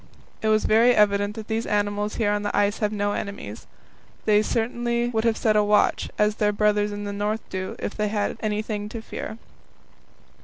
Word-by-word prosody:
It 220 - -1
was 215 0 +3
very 230 +3 +5
evident 205 0 +3
that 220 -1 -7
these 225 +1 -2
animals 205 0 0
here 210 -3 +1
on 205 0 0
the 205 - -2
ice 205 0 +2
have 210 -1 0
no 205 -1 0
enemies. 120 - -6 0.6
They 210 -1 +5
would 215 - +2
certainly 235 +1 0
have 225 -1 +1
set 215 -2 +2
a 210 - +5
watch, 210 0 +2
as 210 +1 +2
their 210 -2 +2
brothers 210 0 +2
in 205 0 -5
the 205 0 -4
North 210 +2 -2
do, 185 0 -4
if - - -4
they 210 0 0
had 205 -1 0
had - - -8
anything 210 -1 -2
to 225 +1 -6
fear. 220 - -6
210 Hz, 200 wpm, -24 LUFS, 205-220 Hz, 0.6 s, very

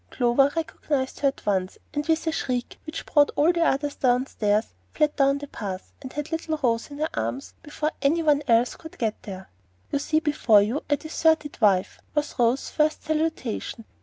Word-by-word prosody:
Clover 260 +3 +3
recognized 295 -4 -2
her 285 - +3
at 275 - -3
once, 190 -2 0 0.2
and 295 +1 -2
with 325 0 +1
a 320 - +1
shriek 250 -6 -3
which 310 - -5
brought 290 -1 +4
all 315 +4 +4
the 335 -1 +2
others 285 -1 +1
downstairs, 245 -4 +1 0.2
flew 300 - +4
down 275 -1 +2
the 285 - -6
path, 195 -7 -6
and 260 -2 -8
had 295 +2 -4
little 325 -1 -2
Rose 230 0 +1
in 285 - -9
her 310 +2 -1
arms 115 +4 -3
before 305 0 -3
any 320 +4 +2
one 295 -2 +4
else 235 +1 +3
could 320 -1 -12
get 220 -3 -2
there. 190 -2 -9 0.4
"You 285 - +1
see 310 +2 +1
before 270 -9 +4
you 235 +8 -1
a 290 - +3
deserted 315 -2 0
wife," 195 -4 +3 0.2
was 295 0 0
Rose's 240 +3 +2
first 310 0 +1
salutation. 305 -8 -2
280 Hz, 190 wpm, -25 LUFS, 230-310 Hz, 0.4 s, brought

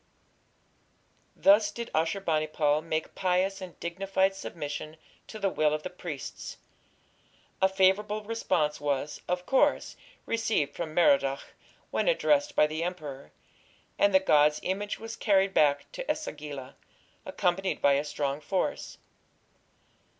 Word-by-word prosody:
Thus 205 +1 +5
did 235 +3 -7
Ashur 165 +5 0
bani 155 -4 0
pal 150 -1 +1
make 160 -1 -3
pious 190 +1 0
and 185 -2 -9
dignified 190 +2 0
submission 155 -4 -6 0.3
to 220 - -8
the 200 - 0
will 155 -2 +2
of 155 - -6
the 185 - -5
priests. 170 -6 -7 1.0
A 190 - +5
favourable 200 +3 +2
response 175 -10 -1
was, 145 0 -2
of 180 0 -2
course, 270 - +2 0.3
received 220 -11 0
from 160 -2 -5
Merodach 175 - +2 0.4
when - - 0
addressed 295 -12 +2
by - - +5
the 155 +2 -3
emperor, 150 - -6 0.7
and 200 - +5
the 190 - +6
god's 150 -4 +4
image 205 +2 -2
was 225 0 -7
carried 195 -2 +2
back 145 -2 +2
to - - -2
E - - 0
sagila, 145 - -7 0.5
accompanied 185 +2 -1
by 140 - +4
a 140 +1 +1
strong 145 -1 -2
force. 190 - -2
180 Hz, 135 wpm, -28 LUFS, 150-200 Hz, 1.0 s, the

